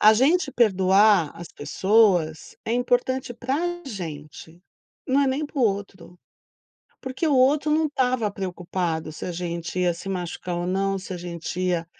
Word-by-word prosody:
A 215 +1 +8
gente 275 +7 +3
perdoar, 195 - +4
as 170 - -9
pessoas 180 0 +1
é 225 - -2
importante 245 +1 0
para 255 +3 -2 0.3
gente. 160 - -8 0.5
Não 265 +2 +3
é 280 - +3
nem 270 +3 0
para 290 - -8
o - - +3
outro, 195 -4 -2 0.8
porque 265 +4 -3
o 300 - +3
outro 285 +4 +3
não 310 +1 +2
tava 255 -6 0
preocupado 175 -4 -3
se - - -8
a 180 - -3
gente 170 0 -4
ia 180 -1 +2
se 180 +3 -8
machucar 180 -1 -4
ou 175 0 -2
não, 195 +1 0
se 190 0 -8
a - - -4
gente 175 0 -5
ia 175 -2 0
195 Hz, 165 wpm, -24 LUFS, 175-250 Hz, 0.8 s, A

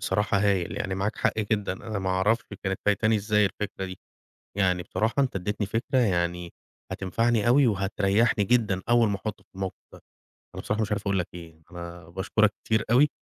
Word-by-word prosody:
بصراحة 100 +1 +1
هايل 95 -3 +1
يعني 95 -2 -2
معاك 95 +2 -2
حق - - 0
جدًا، 105 -2 0
أنا 105 +2 -5
ما 95 -1 -1
أعرفش 105 +5 +2 0.2
كانت 95 0 -1
فايتاني 110 +2 +3
إزاي 105 0 +2
الفكرة 100 0 -4
دي. 95 -1 -7 0.6
يعني 90 -3 +2
بصراحة 110 +2 -1
أنت 135 -6 +1
إدّيتني 105 +2 -2
فكرة 115 +4 0
يعني 85 -5 0 0.4
هتنفعني 115 +4 0
أوي 130 +1 +5
وهتريّحني 100 +2 +2
جدًا 100 -4 +2
أول 120 -2 +5
ما 100 - 0
أحطُّه 105 +2 -6
في - - -49
الموقف 95 -1 -4 0.2
ده. - - -13 0.5
أنا - - -6
بصراحة 110 +1 -1
مش 105 - -2
عارف 100 -1 -1
أقول 100 -2 0
لك 85 - -2
إيه، 80 -2 -11
أنا 85 -1 -9
باشكُرك 100 +4 +1
كتير 110 -1 +1
أوي، 140 +5 +6
100 Hz, 185 wpm, -26 LUFS, 95-110 Hz, 0.6 s, أوي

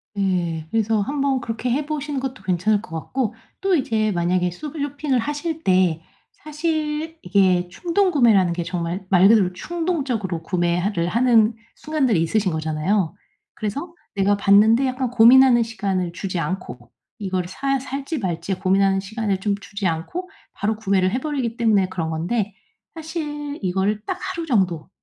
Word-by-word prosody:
네. 175 -5 -1
그래서 220 0 +1
한번 275 +2 0
그렇게 230 +2 -3
해 285 +4 0
보시는 290 -2 -3
것도 260 -1 -5
괜찮을 200 +3 +1
것 165 -6 -5
같고 245 +3 -2 0.3
또 390 -1 +2
이제 220 -7 +1
만약에 180 0 +1
쇼 290 - -7
쇼핑을 285 -2 -2
하실 295 +5 -3
때 180 -3 +3 0.3
사실 310 +1 -3
이게 180 -1 +3
충동구매라는 255 - +3
게 175 0 -3
정말 175 +2 -3
말 185 0 +6
그대로 205 -4 +4
충동적으로 260 - -2
구매 175 -1 0
하를 180 -2 0
하는 230 +1 +3 0.2
순간들이 270 - +1
있으신 190 +3 +1
거잖아요. 160 +4 -1 0.4
그래서 285 - -4 0.2
내가 200 0 +2
봤는데 215 +6 +5
약간 255 -1 -1
고민하는 245 +1 +7
시간을 195 -6 -2
주지 185 +1 -4
않고 130 -8 -5 0.3
이걸 185 -4 -2
사 275 +8 -1
살지 275 +3 -4
말지 185 -1 -2
고민하는 195 0 +3
시간을 205 0 -2
좀 200 +1 0
주지 200 -2 -3
않고 255 - -3 0.2
바로 215 +2 -1
구매를 195 -3 +1
해 250 - 0
버리기 260 -6 -2
때문에 210 -5 +3
그런 170 -4 -3
건데 195 +6 -1 0.4
사실 300 -3 -5
이거를 195 +3 0
'딱 375 -1 -3
하루 370 -3 -4
정도 185 - 0
215 Hz, 335 characters per minute, -22 LUFS, 185-275 Hz, 0.4 s, 고민하는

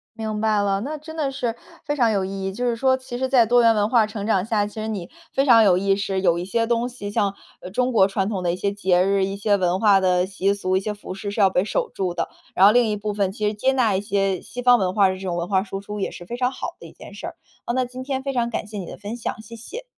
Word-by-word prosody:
明 215 -1 -3
白 215 -2 +2
了， 195 0 0
那 300 +5 -4
真 315 +2 -10
的 290 -4 -1
是 245 -4 -2 0.3
非 290 0 -1
常 235 -5 +3
有 195 -2 0
意 195 0 -5
义。 195 - -2
就 245 +6 -3
是 240 -1 +1
说 260 +2 +2
其 250 -2 -7
实 260 +1 -1
在 250 -3 +5
多 240 +2 +4
元 230 -1 +5
文 210 0 +1
化 230 -3 +4
成 215 -2 -6
长 195 -3 +2
下， 215 -2 +1
其 205 - -9
实 220 0 -4
你 200 -6 -4 0.2
非 270 +1 +2
常 230 -4 +7
有 185 -4 +5
意 195 +1 +2
识， 195 -1 -2
有 170 -3 +3
一 175 - -3
些 230 +4 0
东 235 +1 0
西， 205 -5 -7
像， 200 -1 0 0.3
呃， 180 - -8
中 250 +4 0
国 200 -5 +5
传 195 -1 -1
统 195 -4 -3
的 175 - +1
一 175 - -2
些 200 +2 -1
节 185 -3 +2
日， 195 0 +2
一 195 +1 -4
些 205 0 +2
文 180 0 +1
化 200 -2 +5
的 180 -1 +2
习 195 +1 0
俗， 185 -2 -1
一 - - +3
些 210 +2 -3
服 205 -2 -8
饰 200 +1 -5
是 210 - -5
要 195 -2 +6
被 180 0 +1
守 465 - -1
住 185 -2 -2
的。 170 - -2 0.3
然 190 - +6
后 205 - +8
另 240 -1 +3
一 210 - -1
部 210 0 -3
分 200 -2 0
其 210 0 -2
实 210 - 0
接 260 +6 +1
纳 230 -7 +2
一 190 - 0
些 195 -2 0
西 245 - -7
方 245 0 +6
文 185 -4 0
化 200 -2 +4
的 185 - -1
这 185 - -11
种 180 -2 -3
文 170 +1 -2
化 190 -2 +1
输 195 -1 -6
出 210 +1 -7
也 - - -2
是 175 - -10
非 235 - -5
常 250 0 0
好 - - -6
的 - - -11
一 - - -14
件 - - -12
事 - - -7
儿。 - - -8 0.3
啊， 240 - -1
那 255 0 +1
今 255 +1 -8
天 265 0 -2
非 275 -1 -2
常 235 -1 0
感 215 - -4
谢 210 - -7
你 190 - -5
的 - - -9
分 205 +3 -6
享， 225 -2 -5
谢 225 +2 -11
谢。 445 - -8
210 Hz, 340 characters per minute, -23 LUFS, 195-240 Hz, 0.3 s, 后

